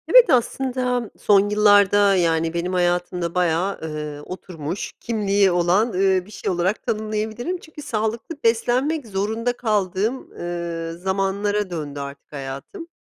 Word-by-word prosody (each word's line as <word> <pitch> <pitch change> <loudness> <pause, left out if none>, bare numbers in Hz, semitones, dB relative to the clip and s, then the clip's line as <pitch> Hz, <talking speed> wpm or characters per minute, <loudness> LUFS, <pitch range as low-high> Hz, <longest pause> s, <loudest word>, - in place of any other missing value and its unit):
Evet, - - +7
aslında 250 -1 +1
son 205 0 +4
yıllarda, 205 -1 +5
yani, 165 -2 +1
benim 175 +2 -2
hayatımda 175 -1 0
bayağı, 180 +2 +1
ııı, 150 -2 -5
oturmuş 175 -1 -6
kimliği 205 -4 +2
olan, 175 +5 +3
ııı, 190 -1 +2
bir 210 - -15
şey - - -3
olarak 180 +4 0
tanımlayabilirim. 220 +9 -2
Çünkü 315 -3 -12
sağlıklı 225 +4 -2
beslenmek 250 +5 +1
zorunda 220 +4 -1
kaldığım, 210 +2 -1
ııı, 170 -1 -4
zamanlara 195 +2 0
döndü 150 -4 -5
artık 140 0 -8
hayatım. 140 - -7
195 Hz, 125 wpm, -22 LUFS, 175-220 Hz, -, Evet